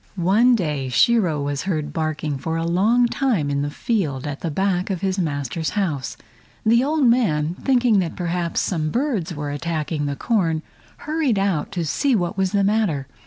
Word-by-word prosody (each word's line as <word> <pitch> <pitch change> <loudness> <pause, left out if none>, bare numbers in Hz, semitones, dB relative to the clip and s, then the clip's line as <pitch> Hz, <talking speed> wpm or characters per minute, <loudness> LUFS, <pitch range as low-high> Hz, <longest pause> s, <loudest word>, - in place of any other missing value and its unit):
One 205 +8 +4
day 150 - -2
Shiro 165 - +3
was 145 0 -2
heard 155 -6 -2
barking 155 -3 -2
for 160 +3 -2
a 165 - -1
long 210 +9 +3
time 235 - 0
in 140 0 0
the 145 - -1
field 150 - -2
at 145 -1 -4
the 170 - -2
back 185 +3 0
of 185 -3 -2
his 190 -1 -1
master's 155 0 -2
house. 155 -10 -2 0.5
The 235 +3 +4
old 300 +1 +1
man, 175 -11 +2
thinking 245 -5 +3
that 175 -3 -2
perhaps 175 -1 -1
some 155 -4 -1
birds 220 - -1
were 145 0 -4
attacking 155 0 -2
the 140 - -2
corn, 165 - 0 0.4
hurried 300 -7 0
out 195 -6 0
to 175 -3 -2
see 260 - +1
what 175 -4 -1
was 190 -1 0
the 200 -1 +2
matter. 195 -9 +1
175 Hz, 180 wpm, -22 LUFS, 150-215 Hz, 0.5 s, One